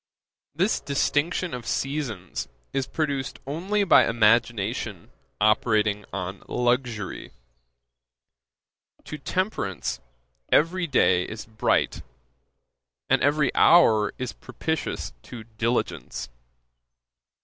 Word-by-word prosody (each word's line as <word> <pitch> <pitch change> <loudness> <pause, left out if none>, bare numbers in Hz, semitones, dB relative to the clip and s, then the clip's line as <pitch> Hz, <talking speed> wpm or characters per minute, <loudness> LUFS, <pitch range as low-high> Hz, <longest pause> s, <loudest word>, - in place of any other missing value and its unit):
This 185 +7 +1
distinction 145 +5 0
of 120 -2 -6
seasons 130 - -3 0.3
is 135 -1 -1
produced 140 -4 -2
only 185 +9 -1
by 195 - +6
imagination 110 -3 +1 0.3
operating 105 -1 +2
on 95 0 -5
luxury. 120 -4 -1 1.7
To 150 - -7
temperance, 135 - -2 0.5
every 170 +3 +3
day 95 - +3
is 110 -1 -7
bright; 110 -1 0 1.1
and - - +4
every 145 0 +2
hour 110 -12 +5
is 125 -1 -4
propitious 160 - -4
to 115 - -9
diligence. 115 - -2
120 Hz, 85 wpm, -25 LUFS, 105-150 Hz, 1.7 s, by